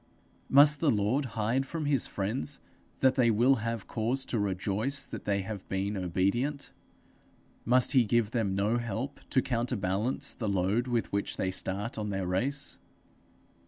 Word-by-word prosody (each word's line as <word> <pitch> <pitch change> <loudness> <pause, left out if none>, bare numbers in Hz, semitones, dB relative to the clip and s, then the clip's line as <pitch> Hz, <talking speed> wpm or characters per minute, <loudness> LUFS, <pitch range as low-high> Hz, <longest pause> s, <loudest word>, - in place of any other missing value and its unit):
Must 145 +1 +6
the 160 - +2
Lord 115 +5 +1
hide 115 +5 +1
from 165 -2 -4
his 145 -2 +1
friends 115 +8 -3 0.4
that 130 -1 +5
they 125 -3 +3
will 120 +5 +4
have 115 -2 -3
cause 125 +4 -2
to 115 - -1
rejoice 105 +7 0
that - - -8
they 100 -1 +1
have 100 0 -7
been 100 +2 -2
obedient? 100 - -1 0.9
Must 125 0 +4
he 130 -4 +5
give 115 0 +1
them 110 -5 0
no 105 +5 +1
help 120 +5 -4
to 130 - +2
counterbalance 120 +1 -1
the 110 -4 -3
load 100 +6 +1
with 120 -2 -1
which 100 - -2
they 95 - -1
start 100 +5 -3
on 105 -1 -3
their 95 -2 -2
race? 130 +11 -1
115 Hz, 160 wpm, -29 LUFS, 100-130 Hz, 0.9 s, Must